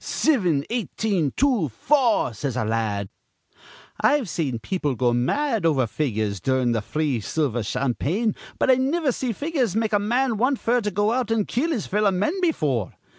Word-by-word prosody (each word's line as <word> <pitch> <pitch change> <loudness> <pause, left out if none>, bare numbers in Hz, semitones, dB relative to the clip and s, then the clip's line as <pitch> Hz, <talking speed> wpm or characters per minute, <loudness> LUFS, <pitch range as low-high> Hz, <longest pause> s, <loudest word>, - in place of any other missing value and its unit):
'Sivin, 180 - +1
eighteen, 210 - -1
two, 250 - +2
four,' 240 - +2
says 125 +3 -4
a 125 - 0
la 110 +1 0
ad. 100 -3 -2 0.9
I've 285 -6 +3
seen 150 -8 -2
people 145 +2 -2
go 120 +1 +1
mad 225 - 0
over 145 -6 +3
figures 110 -6 -2
durin' 130 +3 +1
th' 110 -2 -1
free 150 -1 -1
silver 125 +1 -1
campaign, 145 - -1 0.2
but - - +3
I - - +6
niver 280 +3 +1
see 250 0 -2
figures 260 - -1
make 220 -1 0
a 205 - +4
man 240 +3 0
want 255 +5 +2
f'r 245 +1 +1
to 210 - -1
go 205 +2 +1
out 250 -3 -1
an' 225 -2 +1
kill 280 +8 -1
his 255 - -1
fellow 210 +1 +2
men 195 - 0
befure. 150 - 0
190 Hz, 175 wpm, -23 LUFS, -, 0.9 s, I